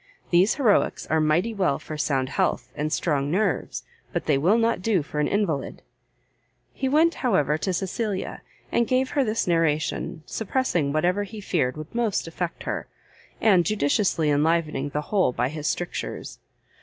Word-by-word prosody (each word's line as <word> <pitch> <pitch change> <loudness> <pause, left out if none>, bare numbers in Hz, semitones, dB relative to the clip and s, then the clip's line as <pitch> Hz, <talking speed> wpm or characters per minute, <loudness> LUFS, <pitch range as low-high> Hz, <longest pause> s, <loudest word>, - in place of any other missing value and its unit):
These 180 +4 +4
heroicks 240 -8 +2
are 160 0 +3
mighty 170 +9 +2
well 185 -9 +1
for 155 - -8
sound 135 -3 0
health, - - -1
and 150 +1 -2
strong 145 -4 0
nerves, 195 +3 -1 0.3
but - - -2
they 150 - +3
will 175 +11 +3
not 230 -4 +1
do 190 -5 +1
for 150 0 -5
an 150 - +2
invalide." 195 -9 -1 0.9
He 265 - -1
went, 320 +4 +4
however, 150 - +2
to 190 - -1
Cecilia, 195 +2 -3 0.3
and 235 - +2
gave 260 0 +1
her 280 - +2
this 220 -2 0
narration, 160 -1 0
suppressing 205 - -1
whatever 175 +6 +1
he 205 +2 -6
feared 155 -9 -1
would 155 +1 -8
most 230 -7 0
affect 170 +1 -4
her, - - -3 0.5
and 190 -6 +5
judiciously 170 -4 +1
enlivening 150 -1 +1
the 150 +1 -2
whole 185 -4 +1
by 125 +2 0
his 150 0 -4
strictures. 175 - -4
175 Hz, 160 wpm, -25 LUFS, 150-215 Hz, 0.9 s, and